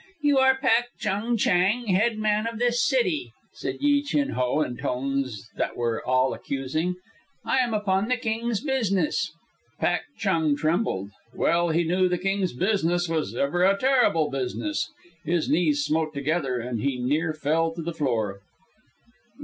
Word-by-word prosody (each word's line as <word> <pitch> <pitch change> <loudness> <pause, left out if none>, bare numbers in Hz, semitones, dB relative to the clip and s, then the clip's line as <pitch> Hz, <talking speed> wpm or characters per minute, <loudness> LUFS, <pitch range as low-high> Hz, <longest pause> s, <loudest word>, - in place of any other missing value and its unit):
"You 290 -2 +4
are 265 0 +5
Pak 245 -3 +3
Chung 225 +5 -1
Chang, 200 +5 +2
head 215 +3 +2
man 215 +1 +1
of 230 -1 -4
this 240 0 +2
city," 180 - +1 0.2
said - - -4
Yi 285 0 +3
Chin 285 0 0
Ho 125 +4 0
in 125 -5 -2
tones 130 -4 -3
that - - -2
were 115 -2 -1
all 130 +1 +2
accusing. 150 +6 -2 0.5
"I - - +1
am 240 -3 +1
upon 200 -1 +1
the 255 +1 +1
King's 230 -1 -2
business." 205 - 0 0.5
Pak - - +1 0.2
Chung 160 -7 +1
Chang - - -2
trembled. 155 - -1 0.2
Well 170 0 +2
he 165 +2 +2
knew 180 +2 +2
the 180 - 0
King's 195 -1 -1
business 175 - +1
was 155 -9 -2
ever 145 +8 +1
a 195 +1 +4
terrible 245 - +3
business. 135 - -2 0.3
His 170 0 0
knees 150 -3 +2
smote 155 0 -1
together, 140 -2 -1
and 120 -2 -3
he 140 -2 0
near 150 +7 0
fell 155 +2 0
to 170 - -5
the 170 +1 -3
floor. 115 -10 -1
175 Hz, 160 wpm, -25 LUFS, 140-220 Hz, 0.5 s, are